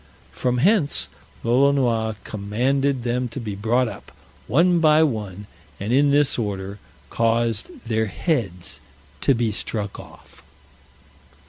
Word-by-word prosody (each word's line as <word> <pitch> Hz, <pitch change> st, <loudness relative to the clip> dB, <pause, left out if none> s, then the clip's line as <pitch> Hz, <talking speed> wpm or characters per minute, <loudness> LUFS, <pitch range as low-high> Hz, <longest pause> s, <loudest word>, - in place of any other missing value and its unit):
From 125 Hz, -1 st, -1 dB
hence 175 Hz, -, +3 dB, 0.3 s
Lolonois 120 Hz, -3 st, +2 dB
commanded 125 Hz, +6 st, 0 dB
them 125 Hz, +1 st, -1 dB
to 120 Hz, +3 st, -7 dB
be 110 Hz, -4 st, -4 dB
brought 115 Hz, +5 st, +1 dB
up, 110 Hz, -, -9 dB, 0.4 s
one 170 Hz, +8 st, +4 dB
by 155 Hz, -1 st, +5 dB
one, 105 Hz, -, -3 dB, 0.3 s
and 105 Hz, +4 st, -2 dB
in 140 Hz, +2 st, +4 dB
this 145 Hz, -2 st, +3 dB
order 100 Hz, -2 st, -4 dB, 0.3 s
caused 115 Hz, 0 st, 0 dB
their 110 Hz, -1 st, +1 dB
heads 100 Hz, -, -2 dB, 0.4 s
to 135 Hz, -, +3 dB
be 115 Hz, -2 st, 0 dB
struck 105 Hz, -1 st, -3 dB
off. -, -, -14 dB
120 Hz, 120 wpm, -23 LUFS, 105-140 Hz, 0.4 s, by